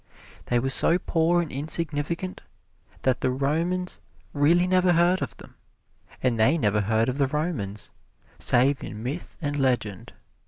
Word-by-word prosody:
They 120 - +1
were 135 +2 0
so 165 +5 +5
poor 175 -1 +1
and 160 - -8
insignificant 155 +4 -1 0.6
that 130 -2 +1
the - - +1
Romans 165 +8 -1 0.3
really 165 +5 +3
never 185 -1 +3
heard 175 +2 +3
of - - -5
them, - - -14 0.7
and 125 -3 +1
they 135 +9 +4
never 105 -7 +1
heard 110 +3 +1
of 130 +2 -3
the 140 - +3
Romans, 135 - -4 0.5
save 130 +3 +3
in 105 +1 -7
myth 140 +8 -6
and 145 -2 -2
legend. 120 -8 -1
145 Hz, 150 wpm, -25 LUFS, 125-170 Hz, 0.7 s, so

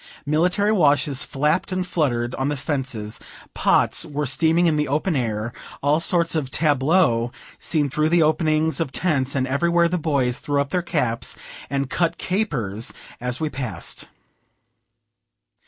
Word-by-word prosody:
Military 180 +8 +2
washes 145 -7 +2
flapped 150 +6 0
and 185 0 -1
fluttered 120 -9 -1
on 135 +1 -1
the 145 - -2
fences; 130 -6 -3 0.3
pots - - +3
were 150 0 -3
steaming 165 +5 +3
in 165 -2 +3
the 150 0 0
open 155 +5 0
air; 115 -2 -2 0.3
all 145 +2 +3
sorts 170 0 +3
of 150 -5 -1
tableaux 140 -5 +2 0.3
seen 150 -3 +1
through 155 +3 0
the 170 0 +4
openings 155 -1 +1
of 165 -5 -1
tents, 140 -5 0
and 130 -1 +1
everywhere 170 +6 +2
the 180 +1 -1
boys 140 -6 +1
threw 145 -1 -1
up 140 0 -1
their 180 - +1
caps 125 -9 -1 0.3
and 140 0 -2
cut 170 -1 0
capers 125 - -2 0.3
as 125 0 -3
we 160 - -1
passed. 125 - -4
145 Hz, 150 wpm, -22 LUFS, 130-165 Hz, 0.3 s, the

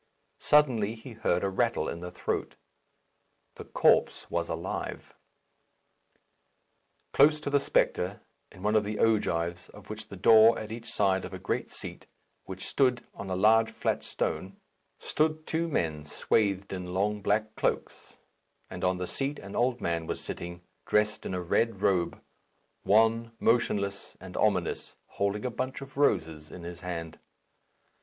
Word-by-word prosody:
Suddenly 120 -8 +3
he 115 +3 -11
heard 100 -5 0
a 100 - +1
rattle 95 - 0
in 85 - -4
the 90 +1 -6
throat. 90 - -3 1.0
The - - -10
corpse - - +2
was - - -1
alive. - - -4 2.0
Close 150 +2 +5
to 140 - -3
the 140 - +4
spectre, 95 -6 +1 0.3
in 90 - -13
one 105 +1 +2
of 110 - +4
the 105 +1 -3
ogives 85 -6 +1
of - - -14 0.2
the - - -8
door, 115 +1 +7
on 110 0 -7
each 115 +1 -7
side 95 -2 +2
of - - -6
a - - -5
great - - -2
seat, - - -9 0.4
which 95 0 -7
stood 125 -3 +2
on 100 - -7
a 95 - -1
large 110 +4 +5
flat - - -1
stone, 95 +1 -3 0.4
stood 155 0 0
two 165 +1 -1
men 80 - -1
swathed 100 +2 0
in 90 -1 -5
long 105 +2 0
black 110 +2 0
cloaks; - - -2 0.6
and - - -6
on 90 0 +2
the 90 - -3
seat 140 +9 -3
an 100 - -9
old 125 0 +1
man 85 -1 -1
was - - -3
sitting, 85 0 -7 0.2
dressed 105 0 +1
in 95 - -3
a 90 - -2
red 105 +3 0
robe 90 -3 +1 0.6
wan, 115 +2 +3
motionless, 100 -4 0
and 90 -1 -10
ominous, 95 -5 0
holding 100 +2 -2
a 125 - -1
bunch 130 +2 -3
of 135 -1 -10
roses 80 - +1
in 90 - -10
his 85 0 -7
hand. 85 -3 -6
105 Hz, 155 wpm, -29 LUFS, 90-115 Hz, 2.0 s, door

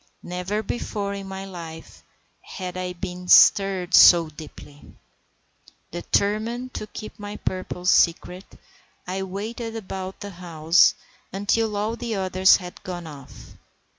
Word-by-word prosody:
Never 180 +4 -3
before 200 -2 -4
in 195 -1 -7
my 190 0 -6
life 165 -4 -10 0.4
had 185 -2 -7
I 180 0 -4
been 180 0 -7
stirred 190 -1 +5
so 170 -3 +8
deeply. 145 -1 -13 1.0
Determined 215 +8 -1
to 215 - -6
keep 215 +1 -10
my 205 0 -7
purpose 185 -1 -2
secret, 180 +2 +1 0.5
I 185 +2 -3
waited 220 +5 -5
about 190 -3 -6
the 205 - -6
house 170 -2 +3 0.4
until 205 +2 0
all 215 +3 -1
the 235 -2 -4
others 190 0 +4
had 180 -1 -10
gone 175 -2 -6
off. 145 -4 -12
190 Hz, 125 wpm, -24 LUFS, 180-205 Hz, 1.0 s, so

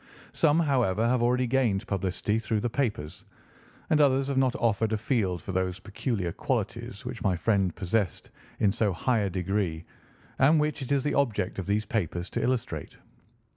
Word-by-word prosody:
Some, 160 0 +3
however, 120 - +2
have 125 0 +2
already 125 +1 +2
gained 120 -6 +1
publicity 100 +2 -1
through 110 -1 -1
the 120 - 0
papers, 110 - -2 0.7
and 155 -1 +5
others 135 -1 +3
have 140 - -1
not 130 -2 +2
offered 110 -1 +1
a - - +2
field 100 - -1
for 95 - -5
those 95 0 -1
peculiar 100 -2 -3
qualities - - -3
which - - -5
my 95 -2 +1
friend 95 -2 +1
possessed 95 -2 -1 0.3
in 100 - +3
so 105 -2 +1
high 115 +7 +1
a 100 -2 0
degree, 90 -2 -2 0.5
and 150 +4 +5
which 150 0 -1
it 135 - -5
is 140 -2 +2
the 145 - 0
object 110 -10 0
of 95 - -5
these 105 +1 +1
papers 90 -4 -2
to - - -2
illustrate. 125 0 -2
110 Hz, 175 wpm, -28 LUFS, 95-130 Hz, 0.7 s, and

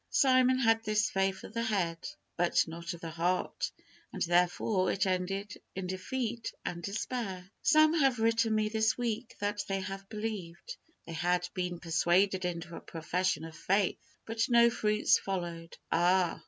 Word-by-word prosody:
Simon 255 -2 +4
had 225 -3 +3
this 215 0 +1
faith 195 0 0
of - - -10
the 230 - -1
head, 185 -7 -1 0.3
but 175 0 +2
not 170 +1 -6
of 170 - -14
the 165 - -5
heart, 175 +3 -1 0.4
and, - - -2
therefore, 180 +2 +2
it 195 - +1
ended 195 +2 -2 0.2
in 190 0 -3
defeat 225 +5 -3
and 170 -1 -3
despair. 200 -1 -4
Some 310 +1 +5
have 270 -6 +3
written 225 0 +2
me 215 0 +2
this 220 0 +1
week 235 -1 -3
that 205 0 -1
they 195 0 -1
had 195 0 -6
believed. 215 - -5 0.3
They 165 - -7
had 175 +2 0
been 180 -2 -3
persuaded 180 +3 +2
into 170 -1 -4
a - - -8
profession 170 +1 -1
of 160 -1 -10
faith, 195 +2 +1 0.3
but 225 +2 -1
no 235 -1 +6
fruits 215 -1 +3
followed. 170 -3 -5
Ah! 175 0 +3
195 Hz, 160 wpm, -31 LUFS, 175-225 Hz, 0.4 s, no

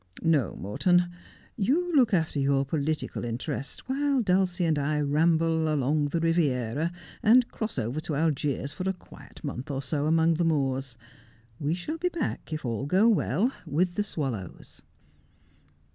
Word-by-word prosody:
No, 155 -7 +2
Morton, 175 - +1 0.4
you 320 - +1
look 250 -5 +5
after 160 -6 +1
your 140 0 +2
political 155 0 -2
interests 125 +3 -4
while 275 -1 +1
Dulcie 185 -2 +2
and 155 -3 +2
I 150 +1 0
ramble 160 +2 +2
along 145 +1 +1
the 155 +3 -1
Riviera 155 -3 +1 0.3
and 240 +2 +5
cross 220 -1 -4
over 120 +7 -2
to 155 -1 -3
Algiers 145 -2 0
for 185 +6 -3
a - - 0
quiet 180 - -15
month 140 -2 -5
or 140 -1 -3
so 145 +3 -1
among 165 +1 +4
the 170 +2 0
Moors. 135 -5 0 0.6
We 150 +2 0
shall 305 - -4
be 360 +2 +1
back, 330 - -4
if 155 -3 -4
all 120 +3 -2
go 190 +8 +4
well, 220 - +2
with 175 +2 0
the 210 - 0
swallows.' 135 - -5
160 Hz, 155 wpm, -27 LUFS, 140-185 Hz, 0.6 s, look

